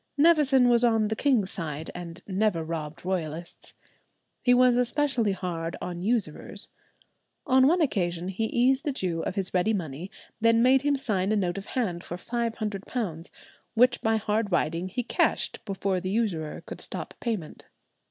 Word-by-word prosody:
Nevison 285 -5 +5
was 240 0 +5
on 225 -3 +3
the 220 - -1
king's 230 -8 +2
side, 160 -3 -3
and 175 0 -8
never 195 -3 +1
robbed 160 +1 -5
Royalists. 170 -2 -4 0.7
He 245 - +3
was 250 0 +5
especially 245 -3 +1
hard 170 -3 -4
on 175 -1 -5
usurers. 205 -6 -2 0.8
On 260 0 +5
one 345 +4 +3
occasion 180 - 0
he 195 +4 -1
eased 260 +5 +2
a - - +3
Jew 175 -8 -2
of - - -3
his 195 -1 -1
ready 185 +4 +2
money, 170 -2 -4 0.3
then 230 +1 +4
made 260 +1 +5
him 285 0 +2
sign 200 -6 0
a - - +3
note 190 -2 0
of 195 - -11
hand 180 -9 -1
for 175 - -6
five 235 +3 -2
hundred 210 -3 -4
pounds, 180 -9 -4 0.5
which 245 +2 +4
by 220 0 +2
hard 210 0 -1
riding 170 +1 0
he 245 +6 -2
cashed - - 0
before 195 -2 -1
the 185 +1 -4
usurer 190 -8 -1
could - - -8
stop - - -6
payment. 215 -10 -4
205 Hz, 170 wpm, -27 LUFS, 175-240 Hz, 0.8 s, Nevison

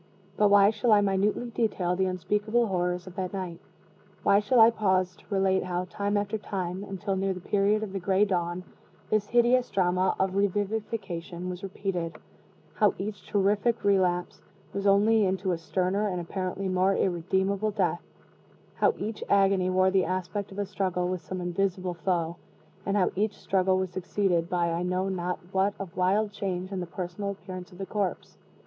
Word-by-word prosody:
But 210 0 +4
why 200 0 +6
shall 220 +2 +1
I 205 - +6
minutely 205 +4 0
detail 190 -6 0
the 190 +1 +1
unspeakable 210 +6 0
horrors 180 -3 -1
of 185 - -10
that 185 0 -3
night? 185 -3 -5 0.6
Why 200 - +5
shall 235 +4 +2
I 225 +1 +8
pause 185 -4 +1
to - - -21
relate 190 -2 +2
how, 180 0 -2
time 205 0 -1
after 205 +2 -1
time, 185 -2 -4
until 195 0 -3
near 190 0 0
the - - -6
period 205 +3 +1
of 200 -3 -6
the 195 - -2
gray 190 +2 +3
dawn, 175 -2 -1 0.5
this 215 -1 +2
hideous 240 +2 +3
drama 185 0 +1
of 190 0 +1
revivification 195 -3 -2
was 180 0 -7
repeated; 190 -3 -3 0.6
how 210 -2 +3
each 200 0 -6
terrific 205 +3 +1
relapse 185 -3 +1 0.3
was 200 0 -1
only 210 +2 +5
into 190 0 0
a 175 - 0
sterner 185 +5 0
and 180 -3 -2
apparently 185 +2 -3
more 185 +1 +2
irredeemable 190 +3 0
death; 190 -4 0 0.7
how - - +2
each 215 +1 -4
agony 195 -2 +3
wore 185 0 +3
the 190 -1 +3
aspect 185 +3 -3
of 195 - -10
a 205 - -1
struggle 185 -2 -1
with 185 -1 -2
some 185 0 -6
invisible 180 0 -1
foe; 170 -1 -1 0.5
and 200 +1 +1
how 185 - +2
each 210 +2 0
struggle 190 -1 +1
was 185 -1 -2
succeeded 185 -2 0
by 175 -1 +1
I 165 +1 -1
know 180 +2 0
not 180 -1 -2
what 195 +1 +1
of 190 -3 -7
wild 200 +4 +2
change 185 -2 -4
in 190 - -3
the 175 - -4
personal 180 +3 -4
appearance 185 -1 -7
of 180 - -14
the 195 - -4
corpse? 200 -3 -3
190 Hz, 180 wpm, -28 LUFS, 180-205 Hz, 0.7 s, I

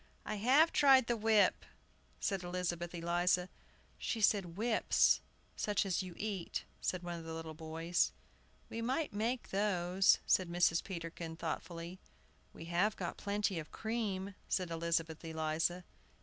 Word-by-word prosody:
"I 215 - -3
have 270 +10 +5
tried 270 -3 +6
the 235 - +1
whip," 220 -2 +3 0.6
said 195 -3 -1
Elizabeth 175 -1 -3
Eliza. 175 +2 +1 0.5
"She 230 - -2
says 205 -2 +3
'whips,' 220 +7 +3 0.3
such 205 -1 0
as 190 -2 0
you 180 -2 -7
eat," 205 -5 -3 0.2
said 185 -1 -1
one 175 -1 -4
of - - -9
the 160 0 -5
little 160 -1 -6
boys. 165 +2 0 0.6
"We 230 - -5
might 260 +5 -1
make 230 +4 -1
those," 190 -2 +3
said 185 -2 +3
Mrs. 170 -1 +3
Peterkin, 170 -2 -6
thoughtfully. 170 +2 -5 0.5
"We 165 - -10
have 180 +6 +1
got 175 -2 -4
plenty 200 -3 -1
of 155 - -8
cream," 205 -4 -3 0.2
said 180 -3 0
Elizabeth 165 -1 -1
Eliza. 160 +2 -1
180 Hz, 140 wpm, -35 LUFS, 170-210 Hz, 0.6 s, tried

